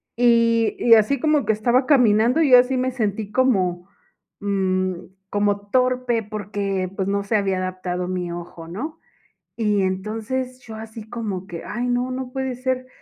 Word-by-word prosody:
y 230 -1 +3
y 235 - +6
así 225 +5 +4
como 305 0 +2
que - - +3
estaba 240 +5 +2
caminando, 250 0 +4
yo 265 -5 +7
así 255 +1 +1
me 255 +1 0
sentí 215 -4 -2
como, 190 -8 +1 0.5
mm, 185 -2 0 0.4
como 205 0 0
torpe 250 -2 +1
porque, 200 -3 -3
pues, 190 - -2
no 200 0 0
se 220 - 0
había 195 -2 +1
adaptado 185 -1 -3
mi 180 -1 -3
ojo, 170 -1 -8
¿no? 300 - -6 0.6
Y 210 -3 +1
entonces, 225 +7 -3
yo 220 -3 -10
así 220 0 -9
como 200 -6 -4
que, 170 -2 -7
"ay 240 +3 -3
no, 245 +1 0
no 255 -1 -5
puede 265 -1 -3
ser." 255 0 -2
220 Hz, 160 wpm, -22 LUFS, 195-250 Hz, 0.6 s, yo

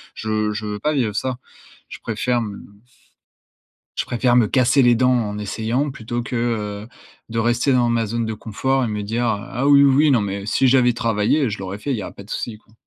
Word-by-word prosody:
Je 110 -1 -1
je 110 0 -5
veux 105 0 -4
pas 150 +1 0
vivre 115 -7 0
ça. 130 +1 -2 0.5
Je - - -9
préfère 120 +2 -1
m 105 -3 -6 1.3
je - - -1
préfère 120 0 +1
me 120 -3 +5
casser 130 +1 +3
les 120 -1 +5
dents 125 +2 +3
en 105 -4 -1
essayant 115 +7 -2
plutôt 120 -2 -4
que, 120 +1 -5
heu, 110 -2 -2 0.4
de 115 - -3
rester 120 +4 +1
dans 120 -2 +3
ma 115 -1 +1
zone 115 +1 -2
de 110 - -3
confort 130 +5 -1
et - - -2
me 105 -1 -3
dire, 115 +4 -2
heu: 100 -3 -2
«Ah 130 +4 -1
oui, 140 0 +7
oui, 135 - +5
oui, - - +4
non, 120 - +3
mais 100 0 -4
si 130 +4 +2
j'avais 125 -1 +4
travaillé, 115 +3 +1
je 105 - -5
l'aurais 95 +1 -6
fait, 140 - -5
il - - 0
y - - -4
a - - -7
pas 100 - -11
de 105 - -16
souci, 110 -3 -4
quoi». 110 - -29
115 Hz, 235 wpm, -21 LUFS, 105-125 Hz, 1.3 s, oui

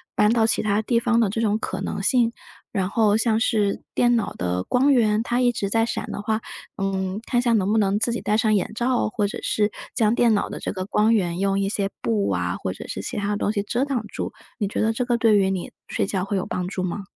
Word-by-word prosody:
搬 210 +1 +4
到 230 -2 +3
其 - - +1
他 210 0 +1
地 230 +1 +2
方 235 0 +2
的 225 -4 +3
这 225 - -2
种 215 -2 +2
可 - - -4
能 - - -3
性， 240 -3 +3 0.4
然 190 -4 0
后 215 -1 +3
像 225 -1 +2
是 210 -4 +1
电 240 0 +4
脑 225 - -1
的 90 +1 -2
光 270 +3 +3
源， 220 -3 +3
它 240 +1 0
一 245 -1 +4
直 205 -4 -2
在 225 +2 +2
闪 235 - -3
的 - - -4
话， 215 +1 0 0.4
嗯， 195 0 -2
看 245 -2 +1
下 240 -1 +2
能 205 -2 +2
不 220 - +3
能 200 -1 +2
自 230 +3 0
己 235 - -3
戴 210 - +1
上 220 -1 +2
眼 200 - 0
罩， 240 -1 +1
或 210 -1 -1
者 200 - -6
是 210 -1 +1 0.2
将 215 -1 +3
电 235 -2 +4
脑 200 - 0
的 - - -6
这 - - -3
个 185 -1 -4
光 210 +2 +2
源 175 -4 0
用 195 0 +1
一 195 0 0
些 200 -1 -1
布 105 -4 +1
啊， 90 -1 -1
或 95 - -2
者 95 - -9
是 95 - -5
其 - - -5
他 205 0 -1
的 205 - 0
东 205 - 0
西 205 -2 -1
遮 240 +5 -1
挡 265 -6 -2
住， - - -5 0.3
你 205 - 0
觉 195 - -3
得 225 +1 +2
这 250 +2 -1
个 240 -1 +1
对 225 -3 +4
于 195 -1 +3
你 190 -2 -3 0.2
睡 - - -1
觉 195 -2 -2
会 195 +1 -1
有 185 - -2
帮 180 -1 -3
助 185 0 -3
吗？ 185 +3 -3
210 Hz, 285 characters per minute, -23 LUFS, 195-230 Hz, 0.4 s, 搬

